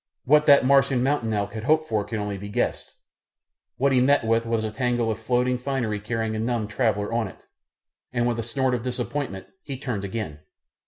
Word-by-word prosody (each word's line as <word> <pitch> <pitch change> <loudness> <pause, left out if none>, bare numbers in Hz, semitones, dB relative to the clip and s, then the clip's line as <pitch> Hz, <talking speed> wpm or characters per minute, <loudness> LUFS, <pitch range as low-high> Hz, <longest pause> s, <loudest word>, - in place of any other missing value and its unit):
What 150 +3 +4
that 140 -2 +7
Martian 135 -2 +4
mountain 135 -5 0
elk 100 -1 -1
had 110 0 -5
hoped 155 +2 +3
for 110 -2 0
can 110 +2 -4
only 105 -2 -3
be 100 +1 -7
guessed, - - -2 0.8
what 140 +2 +2
he 130 -1 +4
met 140 -1 +3
with 115 +1 +1
was 115 -1 0
a 110 - -2
tangle 120 -1 0
of 110 - -4
floating 125 +2 +1
finery 125 -5 -2
carrying 110 +1 -2
a - - -2
numbed 115 -2 -1
traveller 110 -3 0
on 115 -2 0
it, 95 - -14 0.7
and 120 -1 +1
with 120 -1 -1
a - - +1
snort 130 +3 0
of 120 - -1
disappointment 125 -3 -3 0.2
he 140 -2 -6
turned 125 -7 -4
again. 100 -7 -4
115 Hz, 205 wpm, -25 LUFS, 110-130 Hz, 0.8 s, that